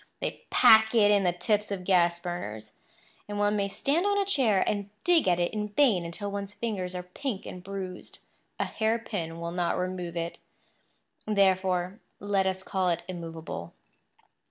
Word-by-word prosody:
They - - -5
pack 220 -2 +6
it 210 -2 +6
in 205 -1 +4
the 175 - +4
tips 205 +4 0
of 195 -2 -4
gas 175 -2 +3
burners; 110 - -6 0.5
and 205 0 -5
one 205 0 +2
may 200 -1 +1
stand 280 - 0
on 405 0 +2
a 400 - +2
chair 250 - +3
and 205 -1 -1
dig 345 - +4
at 175 -1 +3
it 175 +4 0
in 210 -1 -2
vain 210 -5 +3
until 200 +5 -5
one's 200 0 -5
fingers 195 -5 -3
are 180 - -4
pink 200 +4 -5
and 180 - -8
bruised. 190 -2 -7 0.4
A - - +1
hairpin 220 -7 -2
will 170 0 -4
not 175 -1 0
remove 180 -2 -3
it; 170 0 -4 0.9
therefore 190 -1 +2 0.2
let 200 -1 +1
us 190 0 -2
call 190 -2 0
it 170 -1 -1
immovable. 165 - -7
190 Hz, 170 wpm, -28 LUFS, 175-210 Hz, 0.9 s, pack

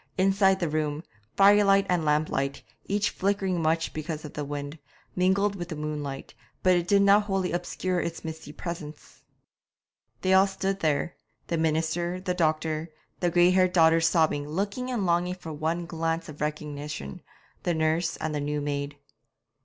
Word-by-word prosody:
Inside 195 0 +3
the 175 - 0
room, 155 0 -2 0.3
firelight 200 0 +6
and 175 -3 +1
lamplight, 150 -2 0 0.2
each 205 +1 +1
flickering 195 -2 0
much 165 +1 0
because 155 0 -5
of 150 - -9
the 150 - -4
wind, 145 +2 -5 0.4
mingled 195 +2 +2
with 175 -2 -6
the 160 - -4
moonlight, 150 -2 -5 0.3
but 180 -2 +3
did 200 +1 +4
not 200 +1 +5
wholly 195 -3 -1
obscure 175 +1 -2
its 170 0 -5
misty 160 -2 -7
presence. 155 -2 -8 1.0
They 185 - +3
all 190 +1 +6
stood 195 0 -2
there 155 0 0 0.3
the 170 - -2
minister, 165 +3 0
the 185 -1 -2
doctor, 160 -1 0 0.3
the 175 - +1
grey 175 +1 +5
haired 185 -1 +3
daughters 165 -1 +5
sobbing, 150 -3 +1
looking 200 +9 -2
and 235 -6 -1
longing 175 +1 +1
for 165 -3 -8
one 160 +3 -2
glance 165 0 -2
of 150 -2 -10
recognition, 150 - -4 0.4
the 175 - 0
nurse, 160 +1 0
and 155 0 -3
the 145 - -2
new 150 +1 -1
maid. 145 0 -3
165 Hz, 160 wpm, -27 LUFS, 155-185 Hz, 1.0 s, firelight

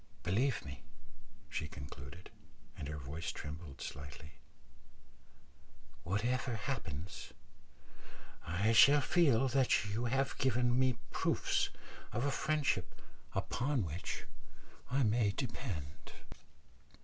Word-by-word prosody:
Believe 115 +7 +1
me," 70 0 -8 0.7
she 75 +1 -3
concluded, 70 +3 -9 0.4
and 70 - -5
her 75 +1 -4
voice 75 +4 -4
trembled 75 -1 -7
slightly, 70 +3 -7 1.7
"whatever 120 +6 0
happens, 100 - -4 1.1
I 90 +7 +1
shall 140 +6 +8
feel 135 -6 +4
that 130 -5 +3
you 115 +3 0
have 135 +3 +1
given 125 -1 +3
me 130 -2 +3
proofs - - +1 0.4
of 120 +5 0
a 145 - +2
friendship 145 -11 0 0.4
upon 125 +4 0
which 85 +3 -4 0.7
I 135 +2 +3
may 110 -2 +3
depend." 110 - -5
110 Hz, 100 wpm, -35 LUFS, 80-130 Hz, 1.7 s, shall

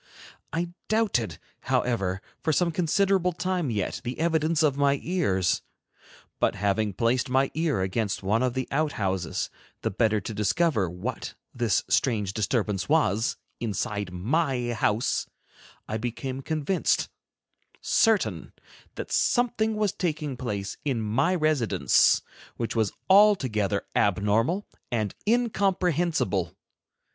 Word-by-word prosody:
I 170 +2 -2 0.2
doubted, 195 - +1 0.2
however, 95 -6 0 0.2
for 160 - +1
some 170 +2 +2
considerable 180 +2 +2
time 180 -3 -1
yet, 105 -5 -2
the 125 +2 -5
evidence 160 -1 +2
of 145 -3 +3
my 140 -1 +2
ears. 100 - +1 0.8
But - - +2
having 105 +1 0
placed 120 +4 +1
my 130 +1 +2
ear 160 - 0
against 95 +2 -1
one 105 +5 +1
of 130 -1 0
the 130 -1 -2
outhouses, 100 - -1 0.3
the - - 0
better 110 +1 +2
to 110 - -6
discover 105 - +1
what 100 +8 -5 0.2
this 120 -5 +1
strange 105 -7 +1
disturbance 105 -2 -1
was, 120 -8 +2 0.2
inside 105 -3 -2
my 125 - 0
house, 110 +1 0 0.6
I 110 - -2
became 130 +3 -4
convinced, 160 +5 0 0.7
certain, 225 -3 +1 0.4
that - - -6
something 230 -3 +2
was 210 -2 +1
taking 155 -7 -2
place 105 -5 -4
in 135 -5 0
my 120 +12 +1
residence 155 - +3 0.3
which 115 0 -3
was 110 -3 +1 0.2
altogether 130 - +4
abnormal 105 - +2 0.3
and 110 -4 -1
incomprehensible. 175 - +1
130 Hz, 115 wpm, -26 LUFS, 105-165 Hz, 0.8 s, altogether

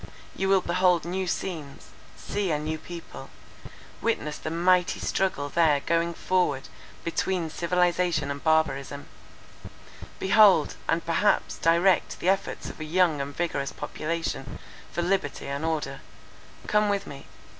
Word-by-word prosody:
You 190 0 -1
will 195 -1 +5
behold 180 -1 +2
new 185 +2 -2
scenes; 150 - -5 0.3
see 190 - -2
a 155 - +1
new 155 +1 -3
people; 170 +1 -9 0.7
witness 155 -10 -1
the - - -4
mighty 180 +2 +2
struggle 185 -7 -1
there 150 -1 +3
going 170 +2 0
forward 165 -9 0 0.3
between 170 -1 -1
civilization 175 -3 +1
and 140 0 -6
barbarism; 145 -3 +1 1.1
behold, 195 -5 +5 0.2
and 165 +1 +1
perhaps 170 +5 +1
direct 170 +3 +3
the 180 - +1
efforts 195 0 -1
of - - -9
a - - -4
young 160 -2 +2
and 140 +1 -6
vigorous 145 -5 -1
population, 155 -2 -4 0.3
for 175 - -2
liberty 180 -5 -1
and 140 +2 -4
order. 150 -4 -2 0.7
Come 210 0 +2
with 200 -1 0
me. 140 -1 -10
170 Hz, 135 wpm, -26 LUFS, 150-185 Hz, 1.1 s, will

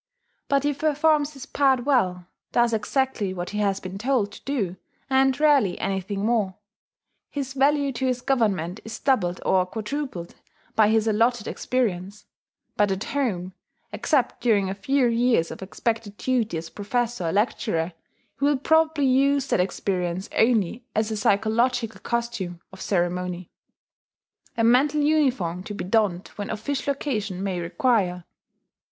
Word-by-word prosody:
But 280 -1 +2
he 290 0 +1
performs 300 0 +2
his 270 -2 -9
part 265 -3 +2
well, 185 -11 +1 0.3
does 240 -1 +3
exactly 220 -3 -1
what 175 0 -4
he 210 - -3
has 200 -2 +1
been 185 +1 -7
told 235 -3 +1
to - - -13
do, 205 -10 -2 0.3
and 265 +1 +3
rarely 280 -12 +4
anything 195 +1 -2
more. 215 -5 +1 0.7
His 270 -2 -4
value 280 +1 +2
to 260 +2 -1
his 250 -1 -1
Government 210 - 0
is 220 - -7
doubled 185 -10 +1
or 185 -1 +4
quadrupled 220 -4 -5 0.4
by 215 -1 +5
his 220 0 +2
allotted 225 +1 +2
experience; 205 -5 -2 0.5
but 205 -1 +3
at 190 +2 -2
home 190 -10 -2 0.4
except 265 -6 0
during 200 -5 +2
a - - -2
few 265 +7 +1
years 235 -7 +2
of - - -8
expected 210 +1 -3
duty 235 -8 0
as 160 0 -7
professor 235 -1 -2
or - - 0
lecturer 185 -4 0 0.5
he 280 - +1
will 290 -1 +3
probably 315 +1 +2
use 275 +1 +3
that - - +2
experience 180 -1 -1
only 225 0 +2
as 220 0 +1
a - - -1
psychological 225 +3 +1
costume 235 -7 -3
of 190 - -11
ceremony, 180 -1 -1 1.1
a 230 - +2
mental 270 +6 +4
uniform 260 - +1
to 205 +2 -7
be - - -4
donned 195 -2 +1
when 205 -1 -4
official 280 +5 -2
occasion 215 -10 -3
may 190 -3 -2
require. 180 0 0
225 Hz, 145 wpm, -24 LUFS, 190-265 Hz, 1.1 s, by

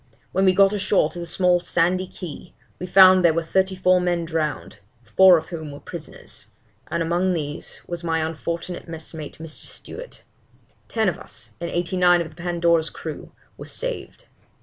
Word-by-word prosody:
When 190 - +2
we 185 -1 +4
got 195 +1 +5
ashore 195 -6 +2
to 175 - -7
the 170 - -5
small 180 -1 +2
sandy 180 +2 +1
key, 175 -1 -9 0.2
we 180 - -5
found 185 0 +7
there 165 -2 +4
were 165 - 0
thirty 190 +3 +1
four 185 0 +3
men 175 -1 0
drowned, 155 -2 -3 0.2
four 185 +7 +6
of 160 - -6
whom 160 -4 -6
were 140 - -9
prisoners, 165 0 -10 0.4
and 170 0 -1
among 175 +3 +1
these 150 -3 -5
was 175 0 -6
my 165 -1 0
unfortunate 170 +4 -5
messmate 160 -2 -8
(Mr. 160 -1 -8
Stewart); - - -10 0.6
ten 220 -2 0
of 180 - -1
us, - - -10
and 170 - -3
eighty 175 +1 -1
nine 175 -1 +5
of 165 -2 -4
the - - -19
Pandora's 170 -1 +1
crew, - - -8 0.3
were - - -8
saved. - - -5
175 Hz, 175 wpm, -23 LUFS, 165-185 Hz, 0.6 s, found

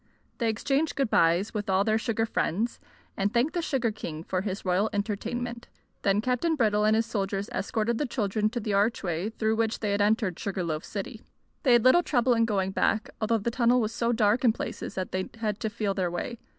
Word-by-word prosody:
They 230 -2 +1
exchanged 275 +7 0
good 270 -5 0
byes 170 +5 +3
with 210 -2 -3
all 190 +1 +3
their 220 +1 +2
sugar 225 -1 0
friends, 225 +2 -1 0.4
and 195 +1 0
thanked 245 +6 +1
the 350 - 0
sugar 260 -8 0
king 160 -7 -6
for 185 +1 -2
his 195 -1 -4
royal 185 +4 +2
entertainment. 235 +4 -3 0.3
Then 200 +1 +2
Captain 255 +8 +1
Brittle 210 -5 +2
and 215 0 +4
his 225 +1 +2
soldiers 200 -2 -2
escorted 225 +3 -1
the 295 - 0
children 215 -3 0
to 240 +2 -3
the 210 -2 -2
archway 200 -3 0
through 220 0 -1
which 225 0 0
they 210 -2 -1
had 200 0 +1
entered 205 -3 +1
Sugar 195 -3 -2
Loaf 155 -2 -2
City. 215 +2 -6 0.4
They 255 - +4
had 240 -2 +5
little 260 +7 +7
trouble 250 -6 +2
in 230 -1 +3
going 195 -4 0
back, 215 +2 0
although 225 +1 +2
the 225 +2 -2
tunnel 240 +1 +3
was 220 -1 -1
so 235 0 0
dark 225 +1 +2
in 235 -3 +5
places - - -5
that 185 -1 -3
they 185 0 -2
had 215 -2 -2
to 220 - -2
feel 205 -1 -2
their 185 -3 -1
way. 220 +7 -4
215 Hz, 215 wpm, -27 LUFS, 200-235 Hz, 0.4 s, little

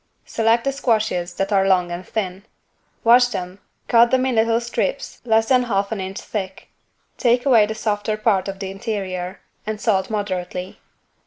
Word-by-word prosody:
Select 225 +1 +1
the 275 - 0
squashes 215 -9 -1
that 195 +3 -1
are 195 -1 +3
long 180 -2 +2
and 175 +1 -5
thin: 190 -2 -4 0.6
wash 245 +2 +6
them 185 -4 -6 0.3
cut 235 0 +5
them 260 0 +2
in 260 - 0
little 225 0 +2
strips 240 - -3
less 225 -1 +2
than 255 -1 +5
half 200 -3 -1
an 215 -3 -3
inch 190 +1 -5
thick. 190 -3 -6 0.5
Take 245 +1 +2
away 230 -6 +5
the 220 - -4
softer 215 -1 -1
part 215 -3 +1
of 195 0 -5
the 190 -1 -5
interior 195 -2 -4 0.3
and 215 -1 -3
salt 195 -4 +1
moderately. 185 -3 -4
210 Hz, 170 wpm, -21 LUFS, 190-230 Hz, 0.6 s, wash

